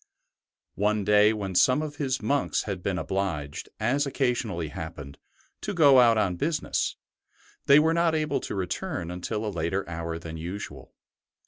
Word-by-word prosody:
One 105 0 +1
day 105 +1 +5
when 100 -3 -4
some 130 - +4
of 145 -1 -6
his 130 -5 -2
monks 140 +5 0
had 95 -4 -4
been 95 0 -1
obliged, 85 -9 -3
as 135 +6 +1
occasionally 120 - -1
happened, 75 -3 -8 0.4
to 205 -2 -4
go 140 -6 +7
out 115 -2 +5
on 95 -5 +1
business, 155 - -1 0.7
they 140 - +8
were 160 +2 +4
not 170 -1 +2
able 155 -1 0
to - - -5
return 90 -2 -3
until 105 +5 -4
a - - -1
later 85 +3 -2
hour 85 0 -4
than 80 -1 -7
usual. 80 -6 -7
105 Hz, 155 wpm, -27 LUFS, 85-135 Hz, 0.7 s, they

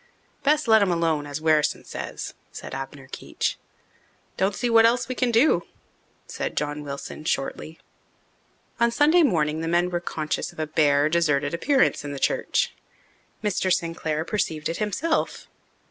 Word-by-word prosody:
"Best 300 -1 +2
let 220 -1 +6
'em 195 -3 +2
alone, 165 -3 0
as 145 +1 -5
Wherrison 155 -2 +2
says," - - -6 0.2
said - - -8
Abner 135 0 -7
Keech. - - -3 0.8
"Don't 195 +1 0
see 245 - -1
what 230 -1 +6
else 235 +1 +3
we 255 - -2
can 250 0 0
do," 235 +7 +4 0.6
said - - -5
John 150 0 -2
Wilson 140 +1 -7
shortly. 155 +2 -3 1.0
On 235 0 +4
Sunday 300 +8 +4
morning 160 - +1
the 165 - -3
men 175 +2 +2
were 175 - 0
conscious 155 -3 -3
of - - -21
a 155 - 0
bare, 150 -1 +3
deserted 150 -3 +1
appearance 265 +10 +2
in 145 0 -5
the - - -5
church. - - 0 0.7
Mr. 190 -2 0
Sinclair 165 -3 -1
perceived 160 -8 -2
it 165 - -3
himself. 245 - -1
165 Hz, 155 wpm, -24 LUFS, 150-225 Hz, 1.0 s, let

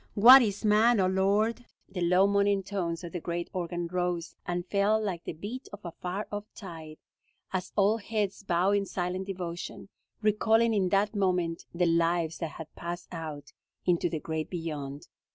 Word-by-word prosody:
What 250 +6 +10
is 210 -2 -1
man, 215 +2 +5
O 190 - +4
Lord?" 200 +5 +1 0.2
The 190 -2 -5
low, 180 +2 +4
moaning 200 0 +2
tones 180 -3 -3
of 170 - -6
the 175 - -4
great 170 +1 -4
organ 175 -1 -3
rose 175 -1 -2
and 175 0 -2
fell 200 +3 +2
like 190 -6 -3
the - - -4
beat 210 - -7
of 205 - -9
a 170 - -4
far 185 +5 -5
off 205 0 -4
tide, 160 -6 -9 0.6
as 185 -1 -2
all 205 +2 +4
heads 210 -2 -2
bowed 190 +1 +2
in 200 -1 -2
silent 185 +1 -3
devotion, 180 0 -6 0.3
recalling 225 +2 +3
in 190 -3 +2
that 200 +3 +2
moment 180 -4 0
the 175 +1 +1
lives 165 -1 +1
that 160 -4 -4
had 160 -2 -10
passed 175 +1 -6
out 155 -4 -7 0.3
into 175 -1 +2
the 160 -1 -3
great 160 0 -4
beyond. 150 -5 -5
185 Hz, 175 wpm, -29 LUFS, 170-205 Hz, 0.6 s, What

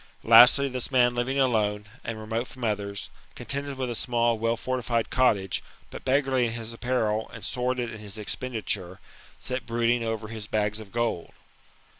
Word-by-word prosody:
Lastly, 120 +5 +8
this 130 -2 -2
man 125 -2 +4
living 125 +3 -1
alone, 105 -5 +1 0.2
and 115 -1 -5
remote 110 +3 -3
from 130 -3 -11
others, 100 -2 -2 0.2
contested 140 0 -3
with 130 -1 -2
a 120 - -3
small 120 0 +1
well 115 +1 +1
fortified 120 -2 -1
cottage, 105 -8 +2 0.3
but - - -8
b^garly 130 -2 +2
in 115 - -4
his 115 -1 -6
apparel, 115 -3 -1
and - - -8
sordid 125 -1 -1
in 110 - -8
his 105 0 -7
expenditure, 105 -5 -3 0.4
sat 125 -2 -5
brood 115 0 +1
ing 120 -1 +1
over 110 -1 -3
his 110 -2 -7
bags 105 -1 0
of 105 -3 -11
gold. 115 -7 -2
115 Hz, 170 wpm, -26 LUFS, 110-125 Hz, 0.4 s, Lastly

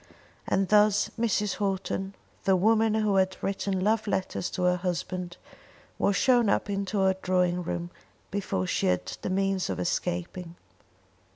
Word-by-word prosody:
And 195 0 +1
thus 210 -1 +4
Mrs. 210 -3 0
Houghton, 195 -1 -2 0.3
the 190 -1 +4
woman 220 +3 +3
who 210 -3 +2
had 190 0 +2
written 195 -1 -1
love 215 +2 +1
letters 190 -2 -2
to 180 - -3
her 180 0 +3
husband, 180 0 -3 0.6
was 200 - +2
shown 240 +1 +4
up 205 - +1
into 195 0 -1
her 190 0 +4
drawing 180 -1 +1
room 175 0 -4 0.4
before 185 - -2
she - - 0
had 90 0 +1 0.2
the - - -3
means 195 0 0
of - - -3
escaping. 175 0 -3
190 Hz, 150 wpm, -27 LUFS, 180-205 Hz, 0.6 s, thus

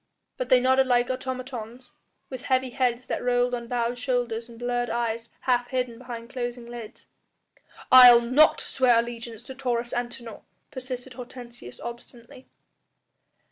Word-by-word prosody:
But - - -4
they 255 - +6
nodded 260 +1 +3
like 245 0 +2
automatons, 255 -2 -6 0.4
with 260 -2 -7
heavy 260 -1 +1
heads 250 0 0
that - - -3
rolled 245 0 +1
on 235 -1 -4
bowed 240 0 -1
shoulders 240 -2 -2
and 230 - -13
blurred 245 0 -2
eyes 230 0 -2
half 245 -1 +1
hidden 250 -2 -3
behind 240 -1 -8
closing 245 -2 -4
lids. 235 -1 -10 0.9
"I'll 245 -2 +10
not 260 +6 +4
swear 250 -3 +2
allegiance 230 -1 -4
to 265 - -9
Taurus 245 -2 -2
Antinor," 240 -2 -5 0.3
persisted 255 0 -7
Hortensius 240 - -10
obstinately. 235 +1 -10
245 Hz, 140 wpm, -26 LUFS, 235-255 Hz, 0.9 s, I'll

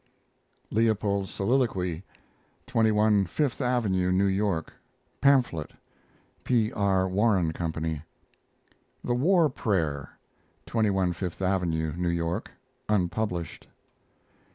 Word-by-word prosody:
LEOPOLD'S 105 -3 +1
SOLILOQUY 95 -7 0 0.6
(21 110 -5 +3
Fifth 140 - -1
Avenue, 105 -8 +1
New 95 +2 +3
York) 95 -4 0 0.5
pamphlet, 125 - +2 0.7
P. 115 -4 +1
R. 95 -2 +1
Warren 95 -4 +2
Company. 80 -2 -3 1.0
THE 120 - 0
WAR 165 +6 +4
PRAYER 85 - -1 0.6
(21 95 -5 +1
Fifth 90 0 -5
Avenue, 85 -5 0
New 90 0 -1
York) 85 0 -2 0.4
(unpublished). 90 -3 -1
95 Hz, 85 wpm, -27 LUFS, 85-110 Hz, 1.0 s, WAR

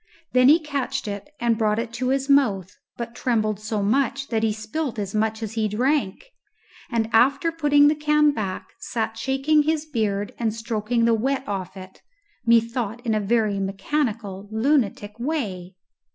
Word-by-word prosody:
Then 255 +1 +6
he 310 - +8
catched 280 -6 -3
it 205 +7 -5
and 235 -1 +1
brought 215 -1 +2
it 230 0 -3
to 250 +2 -2
his 270 0 0
mouth, 210 -10 +2 0.2
but 235 -1 -5
trembled 215 -4 0
so 210 -1 -2
much 275 +5 0
that 225 -2 0
he 220 -1 +2
spilt 225 +5 -4
as 200 -2 -4
much 220 +1 0
as 220 0 -5
he 220 -1 0
drank, 255 - -1 0.6
and 230 -2 0
after 275 +8 +4
putting 290 -3 +4
the 300 - +4
can 300 0 +3
back 200 -8 -4
sat 225 -1 -3
shaking 270 +6 +2
his 310 0 0
beard 210 -8 -2
and 225 -2 -1
stroking 225 +1 -1
the 230 - +4
wet 265 +4 -1
off 190 -1 -4
it, 190 0 -12 0.5
methought, 230 0 +1
in 225 - +1
a 215 - +2
very 210 -1 +1
mechanical 200 0 -2
lunatic 220 -3 0
way. 205 - -3
230 Hz, 165 wpm, -23 LUFS, 210-275 Hz, 0.6 s, he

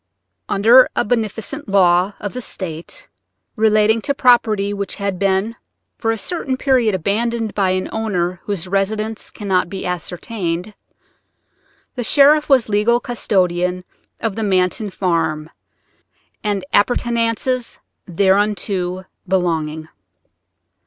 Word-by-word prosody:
Under 230 +6 +6
a - - +1
beneficent 225 +4 -3
law 185 0 +3
of 205 - -5
the 250 - -5
State 170 -7 -7 0.5
relating 215 +1 +3
to 280 +5 -1
property 215 -6 +3
which 200 -1 -4
has 200 -1 -2
been 195 +4 0 0.4
for 225 - -1
a 225 - +1
certain 270 - -2
period 250 -7 +2
abandoned 220 +4 -1
by 195 -2 +1
an 185 0 -1
owner 185 -5 -2
whose 190 -4 -3
residence 215 +3 -2
cannot 190 -4 -1
be 190 0 -6
ascertained, 180 +1 -4 1.2
the 245 - -4
sheriff 295 +5 +4
was 265 -4 +4
legal 215 +3 +2
custodian 180 -6 0 0.4
of 225 -4 -2
the 225 - -3
Manton 190 +1 +1
farm 165 -5 -1 0.9
and 205 -3 -1
appurtenances 235 +2 0 0.3
thereunto 190 -1 0 0.2
belonging. 160 -4 -1
205 Hz, 110 wpm, -19 LUFS, 185-225 Hz, 1.2 s, Under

